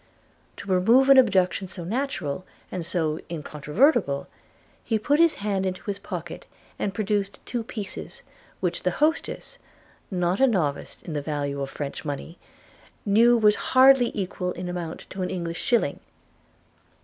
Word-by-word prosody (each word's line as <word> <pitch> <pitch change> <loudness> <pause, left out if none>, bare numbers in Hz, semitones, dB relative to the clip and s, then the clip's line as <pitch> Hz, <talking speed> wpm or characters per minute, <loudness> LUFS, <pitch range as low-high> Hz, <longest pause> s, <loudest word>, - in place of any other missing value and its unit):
To - - -9
remove 225 +9 +4
an 275 -1 +9
objection 190 -5 +2
so 180 -1 -8
natural, 190 - -3 0.3
and 180 - -3
so 160 -2 -1
incontrovertible, 155 - +1 0.6
he 225 - 0
put 285 +8 +1
his 335 -1 +5
hand 200 -2 -1
into 185 -1 -3
his 200 -1 -4
pocket, 175 -4 -7 0.3
and 200 - -1
produced 205 -1 -1
two 240 - -3
pieces, 215 -4 -6 0.4
which 180 -2 -1
the 180 - +1
hostess, 320 +10 -1 0.5
not 180 -1 0
a 270 - +6
novice 165 - -1
in 165 - -6
the 145 - -1
value 145 -1 -3
of 135 - -3
French 140 0 -5
money, 150 +3 -6 0.7
knew 230 +4 +5
was 210 -2 +5 0.2
hardly 260 -2 +7
equal 185 -2 -3
in 180 +1 -6
amount 175 -2 -5
to 190 - -5
an 180 - -1
English 170 -2 -4
shilling. 235 -2 +1
190 Hz, 150 wpm, -25 LUFS, 170-230 Hz, 0.7 s, an